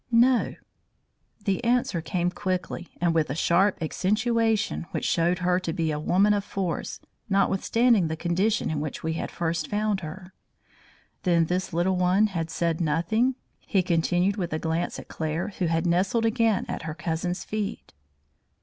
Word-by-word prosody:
"No." 240 Hz, +1 st, +3 dB, 0.9 s
The 195 Hz, -2 st, 0 dB
answer 235 Hz, -8 st, +1 dB
came 175 Hz, +1 st, -1 dB
quickly, 180 Hz, -2 st, -3 dB
and 170 Hz, -1 st, +2 dB
with 160 Hz, -3 st, +1 dB
a 135 Hz, -, -2 dB
sharp 185 Hz, +5 st, +3 dB
accentuation 220 Hz, +2 st, 0 dB
which -, -, -3 dB
showed 175 Hz, +1 st, +2 dB
her 180 Hz, 0 st, +3 dB
to 180 Hz, -3 st, -3 dB
be 160 Hz, -1 st, 0 dB
a 150 Hz, -, -2 dB
woman 195 Hz, +7 st, +3 dB
of 205 Hz, -1 st, 0 dB
force, 185 Hz, -5 st, -3 dB, 0.3 s
notwithstanding 195 Hz, +1 st, +3 dB
the 160 Hz, 0 st, -3 dB
condition 185 Hz, +6 st, 0 dB
in 155 Hz, -, -1 dB
which 150 Hz, -1 st, -5 dB
we 160 Hz, 0 st, -1 dB
had 160 Hz, -, -3 dB
first 165 Hz, -2 st, -2 dB
found 210 Hz, -1 st, 0 dB
her. 180 Hz, +3 st, -9 dB, 0.9 s
"Then 170 Hz, -3 st, +3 dB
this 185 Hz, +3 st, -2 dB
little 180 Hz, +2 st, +1 dB
one 180 Hz, +4 st, +4 dB
had 165 Hz, -2 st, -2 dB
said 165 Hz, +1 st, -1 dB
nothing," 170 Hz, +11 st, +1 dB, 0.2 s
he 190 Hz, -3 st, 0 dB
continued 175 Hz, +3 st, +1 dB
with 175 Hz, -5 st, -2 dB
a -, -, +1 dB
glance 165 Hz, +1 st, -2 dB
at -, -, -9 dB
Claire 160 Hz, +5 st, -3 dB
who 180 Hz, -, +1 dB
had 165 Hz, +1 st, 0 dB
nestled 190 Hz, +7 st, +2 dB
again 225 Hz, -2 st, +2 dB
at -, -, -4 dB
her 155 Hz, -1 st, -5 dB
cousin's 175 Hz, +1 st, -2 dB
feet. 215 Hz, 0 st, -4 dB
180 Hz, 165 wpm, -26 LUFS, 165-205 Hz, 0.9 s, one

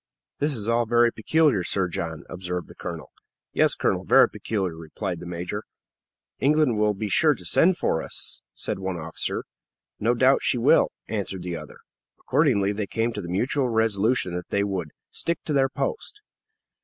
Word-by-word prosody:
"This 145 Hz, 0 st, +1 dB
is 110 Hz, -2 st, -3 dB
all 115 Hz, 0 st, +2 dB
very 120 Hz, 0 st, +4 dB
peculiar, 145 Hz, -1 st, +2 dB
Sir 95 Hz, +1 st, +1 dB
John," 80 Hz, -2 st, -4 dB
observed 90 Hz, -1 st, -4 dB
the -, -, -12 dB
colonel. -, -, -7 dB, 0.4 s
"Yes, -, -, +3 dB
colonel; -, -, 0 dB
very -, -, +6 dB
peculiar," 95 Hz, -6 st, -3 dB
replied 85 Hz, +3 st, -5 dB
the 90 Hz, -, -8 dB
major. 90 Hz, +4 st, -4 dB, 0.8 s
"England 145 Hz, -5 st, +3 dB
will 105 Hz, -1 st, +2 dB
be 105 Hz, +2 st, -3 dB
sure 150 Hz, +8 st, +4 dB
to 90 Hz, -, -13 dB
send 175 Hz, -, +4 dB
for 80 Hz, -, 0 dB
us," -, -, -4 dB
said -, -, -4 dB
one 95 Hz, -2 st, -3 dB
officer. 80 Hz, 0 st, -3 dB, 0.6 s
"No 120 Hz, +3 st, +2 dB
doubt 130 Hz, +3 st, +4 dB
she -, -, +1 dB
will," 115 Hz, -, +4 dB, 0.2 s
answered 95 Hz, -4 st, -3 dB
the 90 Hz, -1 st, -3 dB
other. 75 Hz, -2 st, -9 dB, 0.4 s
Accordingly, 125 Hz, -8 st, +2 dB
they 105 Hz, 0 st, -3 dB
came 115 Hz, +3 st, -1 dB
to 105 Hz, -, -4 dB
the 85 Hz, -, -7 dB
mutual 125 Hz, +8 st, 0 dB
resolution 110 Hz, -3 st, +1 dB
that 90 Hz, 0 st, -5 dB
they 100 Hz, -, +1 dB
would 95 Hz, -5 st, -2 dB, 0.2 s
"stick 170 Hz, -1 st, -1 dB
to 150 Hz, -, -2 dB
their 135 Hz, -1 st, +3 dB
post." 445 Hz, -, -4 dB
105 Hz, 175 wpm, -25 LUFS, 90-125 Hz, 0.8 s, very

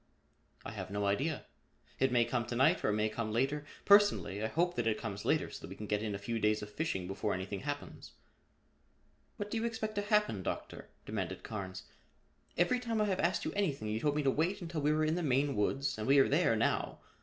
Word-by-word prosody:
"I -, -, -5 dB
have -, -, -6 dB
no 100 Hz, +1 st, -1 dB
idea. 135 Hz, +10 st, 0 dB, 0.5 s
It 135 Hz, -1 st, +3 dB
may 120 Hz, -1 st, +4 dB
come 120 Hz, -2 st, -1 dB
to 120 Hz, -, -3 dB
night 145 Hz, +9 st, +4 dB
or -, -, +2 dB
it -, -, +2 dB
may 105 Hz, 0 st, +2 dB
come 110 Hz, 0 st, -3 dB
later. 135 Hz, +6 st, 0 dB, 0.2 s
Personally 200 Hz, -, +5 dB
I -, -, +1 dB
hope 175 Hz, +9 st, +1 dB
that 120 Hz, -1 st, 0 dB
it 110 Hz, -, +2 dB
comes 100 Hz, -3 st, -5 dB
later -, -, +1 dB
so -, -, -8 dB
that -, -, -8 dB
we -, -, -8 dB
can 105 Hz, -, -7 dB
get 105 Hz, 0 st, 0 dB
in 105 Hz, -2 st, -2 dB
a -, -, -2 dB
few 115 Hz, +3 st, -3 dB
days 105 Hz, 0 st, +2 dB
of 105 Hz, -, -8 dB
fishing 105 Hz, -, -2 dB
before 95 Hz, +2 st, -2 dB
anything 95 Hz, +2 st, -4 dB
happens." 145 Hz, +1 st, -6 dB, 1.2 s
"What 205 Hz, -1 st, -5 dB
do 230 Hz, -, 0 dB
you 225 Hz, -, -1 dB
expect 225 Hz, -2 st, -2 dB
to 205 Hz, -, -1 dB
happen, 210 Hz, -, +2 dB
Doctor?" -, -, -5 dB, 0.2 s
demanded -, -, -4 dB
Carnes. 95 Hz, -3 st, -6 dB, 0.7 s
"Every 210 Hz, +9 st, +3 dB
time 230 Hz, -3 st, -2 dB
I 210 Hz, -, +3 dB
have 190 Hz, -3 st, 0 dB
asked 175 Hz, +2 st, +1 dB
you -, -, -2 dB
anything 145 Hz, -, -1 dB
you 110 Hz, +1 st, -1 dB
told 145 Hz, +3 st, +1 dB
me 150 Hz, -, +1 dB
to 135 Hz, -, +3 dB
wait 165 Hz, +8 st, 0 dB
until 165 Hz, -3 st, -4 dB
we 150 Hz, +1 st, +3 dB
were 155 Hz, 0 st, +2 dB
in 155 Hz, -, +1 dB
the 175 Hz, -, -1 dB
Maine 140 Hz, -2 st, +1 dB
woods 135 Hz, +7 st, 0 dB
and 110 Hz, -, -3 dB
we 140 Hz, +1 st, +6 dB
are 135 Hz, -, +6 dB
there 145 Hz, -5 st, +3 dB
now. 110 Hz, -, 0 dB
135 Hz, 235 wpm, -33 LUFS, 105-170 Hz, 1.2 s, we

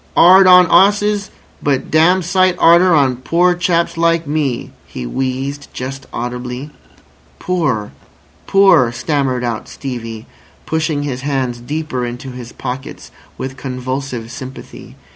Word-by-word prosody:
"'Ard 185 Hz, +2 st, +7 dB
on 180 Hz, 0 st, +8 dB
'osses, 205 Hz, +2 st, +3 dB, 0.3 s
but 140 Hz, -2 st, -1 dB
dam' 175 Hz, +4 st, +4 dB
sight 185 Hz, +1 st, +2 dB
'arder 170 Hz, +2 st, +5 dB
on 135 Hz, -4 st, +2 dB
poor 175 Hz, +7 st, +2 dB
chaps 170 Hz, -1 st, 0 dB
like 165 Hz, 0 st, +2 dB
me," 145 Hz, -4 st, -2 dB, 0.2 s
he 60 Hz, -, -7 dB
wheezed 135 Hz, -, -3 dB
just 135 Hz, +2 st, -6 dB
audibly. 125 Hz, +3 st, -5 dB, 0.7 s
"Poor! 145 Hz, -13 st, -1 dB, 0.6 s
Poor!" 195 Hz, -12 st, +5 dB
stammered 130 Hz, 0 st, -1 dB
out 115 Hz, -2 st, -4 dB
Stevie, 115 Hz, -4 st, -7 dB, 0.4 s
pushing 155 Hz, -2 st, -1 dB
his 130 Hz, -3 st, -4 dB
hands 130 Hz, -4 st, -2 dB
deeper 140 Hz, 0 st, -4 dB
into 125 Hz, +2 st, -6 dB
his 125 Hz, -1 st, -9 dB
pockets 130 Hz, +1 st, -7 dB, 0.3 s
with 130 Hz, 0 st, -6 dB
convulsive 130 Hz, -2 st, -5 dB
sympathy. 130 Hz, +2 st, -10 dB
135 Hz, 125 wpm, -16 LUFS, 125-170 Hz, 0.7 s, on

